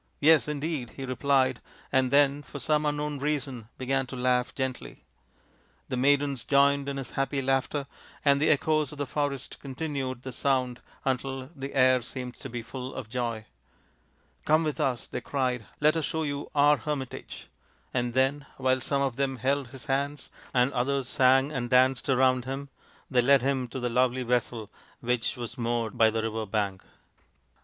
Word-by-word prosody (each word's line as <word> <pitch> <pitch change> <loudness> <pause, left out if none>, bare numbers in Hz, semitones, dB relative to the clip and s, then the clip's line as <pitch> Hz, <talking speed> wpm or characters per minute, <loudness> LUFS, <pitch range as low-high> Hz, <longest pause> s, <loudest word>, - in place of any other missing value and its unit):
Yes, 155 0 +5
indeed, 150 -3 -2
55 - - -18
he 135 - -4
replied, 130 -1 +1 0.3
and 130 -1 +3
then 140 +1 +4
for 145 - -9
some 150 +1 +1
unknown 145 0 -2
reason 135 -6 -2
began 135 0 0
to 130 - -7
laugh 125 0 +1
gently. 130 -1 -4 0.9
The - - -1
maidens 140 0 +2
joined 140 0 +3
in 140 - -3
his 135 - -5
happy 135 +1 -1
laughter, 135 +2 0 0.4
and 140 0 +4
the 155 - +4
echoes 155 -1 +2
of 150 - -10
the 145 - -2
forest 140 -1 -3
continued 135 -3 -4
the 130 - -5
sound 130 -1 0 0.2
until 135 +1 -2
the 135 0 -6
air 130 -1 +5
seemed 125 0 -6
to 135 - -7
be 120 -1 -5
full 130 +3 -7
of 125 -5 -6
joy. 115 -3 -2 0.5
" - - -38
Come 155 +2 +4
with 155 -2 -2
us," 125 -3 0
they - - -5
cried. 125 -4 -1
" - - -32
Let 155 +2 +5
us 160 -3 0
show 160 0 -2
you 145 -1 -3
our 145 +1 +5
hermit 145 -4 -3
age;" - - -9 0.5
and 120 -1 -1
then, 135 +2 +1
while 130 -1 +1
some 140 +1 0
of 130 -4 -1
them 135 -1 0
held 135 +3 0
his 130 +1 -10
hands, 140 +1 -2 0.2
and 125 +2 +2
others 135 +1 0
sang 135 +2 +4
and 125 -4 -3
danced 130 +1 +3
around 130 -1 +3
him, 135 +2 -5 0.4
they 125 -2 +4
led 135 0 +5
him 135 -2 0
to 130 - -6
the 125 - -1
lovely 125 +1 +2
vessel 120 -3 -1 0.3
which 125 +2 -1
was 120 0 -6
moored 115 -2 -1
by 110 -1 +5
the 110 0 -1
river 110 -1 -2
bank. 100 -2 -1
130 Hz, 180 wpm, -28 LUFS, 125-140 Hz, 0.9 s, Yes